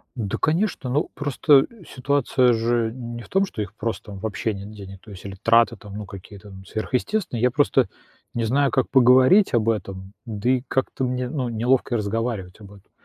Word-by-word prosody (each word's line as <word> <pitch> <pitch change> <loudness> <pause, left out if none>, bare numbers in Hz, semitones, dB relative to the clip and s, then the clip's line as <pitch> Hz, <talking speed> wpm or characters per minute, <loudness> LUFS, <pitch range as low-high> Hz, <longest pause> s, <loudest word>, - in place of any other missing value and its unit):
Да, 105 -5 -3
конечно. 160 -5 0
Ну, 145 +5 0
просто 145 -1 +3 0.2
ситуация 130 -2 +2
же 115 0 0
не 120 -2 -7
в - - -16
том, 195 +1 +2
что 110 - -6
их 100 0 -6
просто, 110 -1 -4
м, 95 - -8
вообще 110 +1 -2
нет 100 +2 -8
денег. 95 -2 -10
То 110 - -14
есть 95 0 -11
или 95 -1 -6
траты 115 +1 +4
там, 100 +1 -12
ну, 105 -1 -6
какие-то 100 +2 -12 0.2
сверхъестественные. 125 - -2
Я 125 - +4
просто - - +2 0.5
не 115 - -1
знаю, 140 +4 +2
как 130 - +1
поговорить 130 - +5
об 115 -1 +2
этом, 95 -2 -4
да 110 +1 -2
и 130 -1 +3
как-то 130 0 -1
мне, 125 0 -1
ну, 130 -4 -2
неловко 120 +2 +1
разговаривать 105 -2 -3
об 100 -1 -13
этом. 100 - -19
115 Hz, 190 wpm, -23 LUFS, 105-130 Hz, 0.5 s, поговорить